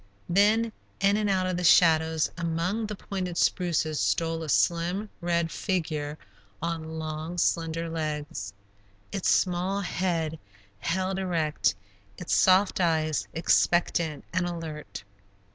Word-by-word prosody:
Then, 210 +5 +3 0.3
in 200 0 +3
and 210 -1 0
out 190 -1 +2
of 185 -1 -1
the 180 - -3
shadows, 160 -2 +4
among 170 +6 -1
the 210 - -5
pointed 185 -3 -4
spruces, 165 -5 +1
stole 165 0 0
a 160 - -5
slim, 175 +7 +1
red 170 -1 0
figure 155 -6 -2 0.4
on 160 -1 -4
long, 160 +2 -5
slender 165 -1 0
legs, 155 -2 -4 0.6
its 195 -2 0
small 185 +2 +1
head 170 -4 -1 0.4
held 185 - -1
erect, 155 - 0 0.4
its 180 - -3
soft 190 +1 +4
eyes 155 -3 +1
expectant 170 -1 +2
and 180 -1 +1
alert. 160 -8 -6
170 Hz, 120 wpm, -27 LUFS, 160-185 Hz, 0.6 s, shadows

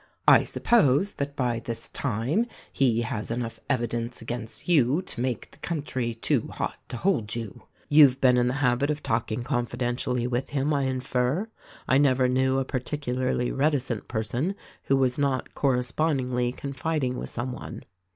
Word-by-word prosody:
I - - +7
suppose 195 - +3
that 140 0 -4
by 120 -4 0
this 115 0 -3
time 140 - 0 0.3
he 120 -4 +2
has 115 -2 -3
enough 115 0 -3
evidence 120 -2 -1
against 120 +3 -6
you 150 0 +3
to 120 - -6
make 125 -3 -2
the - - -19
coun 165 -4 -3
try 120 -5 -2
too 115 - 0
hot - - -3 0.2
to 120 - -4
hold 115 - 0
you. 115 -4 -7 0.2
You've 145 -3 +6
been 125 -2 +5
in 125 0 +3
the 125 - 0
habit 135 0 +2
of 150 0 -2
talk 115 0 -1
ing 110 +2 -2
confidentially 120 -1 -1
with 125 +1 -1
him, 145 +1 0
I 140 -2 +1
infer. 130 - 0 0.4
I 130 - +4
never 130 -2 +4
knew 130 +1 +2
a 135 - 0
par 130 -1 -2
ticularly 125 -2 -2
reticent 135 -6 0
person 120 - -2 0.3
who 135 - +3
was 130 0 +1
not 140 -2 0
correspondingly 125 -1 0
con 140 +1 -6
fiding 140 -2 -1
with - - -5
some 120 +2 -3
one." - - -8
130 Hz, 170 wpm, -26 LUFS, 120-140 Hz, 0.4 s, I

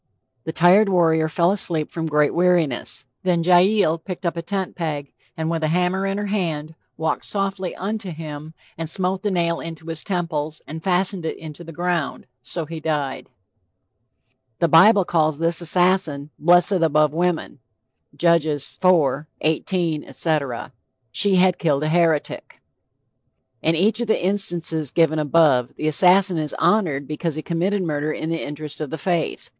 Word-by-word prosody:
The 160 - -3
tired 185 +6 +4
warrior 160 -4 +2
fell 170 +3 +2
asleep 170 -6 0
from 165 -1 -3
great 150 -1 +2
weariness. 170 -8 0 0.2
Then 175 -2 +1
Jael 180 -1 +3
picked 180 +2 -8
a 170 - +2
tent 190 +2 -4
peg 150 -5 -4 0.2
and 160 0 -2
with 165 -1 -2
a - - +2
hammer 180 +4 0
in 195 0 -2
her 205 - -3
hand 165 -7 -3 0.2
"walked 160 - -2
softly 195 -2 -3
unto 205 +1 -4
him, 155 -1 -8 0.2
and 165 -1 -3
smote 185 +2 -1
the 210 - -1
nail 170 -3 0
into 165 -1 -8
his 165 -1 -5
temples, 160 -5 -3
and 160 +2 -8
fastened 185 0 0
it 160 - -4
into 160 +1 -10
the 165 - -10
ground...So 160 -4 -4
he 160 +1 -7
died." 150 -4 -3 1.3
The 170 - +2
BIBLE 185 +5 +6
calls 155 -3 +1
this 165 +1 +1
assassin 170 -4 +1
"blessed 175 +4 +5
above 155 -2 +2
women." 170 -3 -2 0.6
(Judge 170 -2 +3
IV. 150 -1 +1 0.2
18, 160 0 -1
etc.) 145 -8 -2 0.4
She 200 - +4
had 185 0 +3
killed 150 -4 +1
a 155 - 0
heretic. 165 -2 0 1.0
In 165 +1 +1
each 215 +7 +1
of 240 - -2
the 210 - 0
instances 170 -6 0
given 160 0 +2
above, 145 -5 +2
the 155 - -3
assassin 180 +3 +5
is 150 -2 -3
honored 155 -10 +1
because 155 +1 -3
he 155 - -5
committed 185 +4 -1
murder 150 -2 -2
in 160 +1 -4
the 165 - -2
interest 150 +1 -7
of 150 - -4
the 160 - -5
faith. 170 +1 -2
165 Hz, 160 wpm, -21 LUFS, 155-180 Hz, 1.3 s, BIBLE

